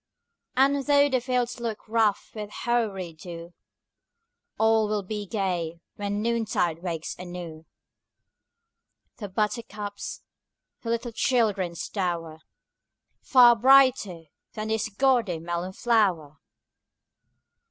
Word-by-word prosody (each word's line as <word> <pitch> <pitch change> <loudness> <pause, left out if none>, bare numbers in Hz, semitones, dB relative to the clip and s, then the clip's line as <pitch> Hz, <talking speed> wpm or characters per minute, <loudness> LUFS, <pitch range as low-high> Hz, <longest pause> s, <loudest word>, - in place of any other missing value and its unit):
And 275 +1 +3
though 285 0 +5
the 260 -2 +1
fields 245 -1 -1
look 230 -2 -5
rough 220 -2 +1
with 210 -2 -6
hoary 210 -7 -2
dew, 170 +1 -10 1.0
All 220 -1 +3
will 210 -1 -1
be 205 +1 -5
gay 180 -5 -2 0.2
when 205 0 -3
noontide 220 -8 0
wakes 165 -3 -4
anew 175 -3 -8 1.5
The 205 -3 -6
buttercups, 210 0 -4 0.6
the 230 - -6
little 235 +1 -2
children's 210 -7 0
dower 170 -5 -3 0.8
Far 245 -3 +7
brighter 255 -8 +4 0.3
than 215 0 -4
this 220 0 -1
gaudy 230 -5 +2
melon 175 +3 -4
flower! 185 -11 +1
210 Hz, 100 wpm, -26 LUFS, 175-235 Hz, 1.5 s, Far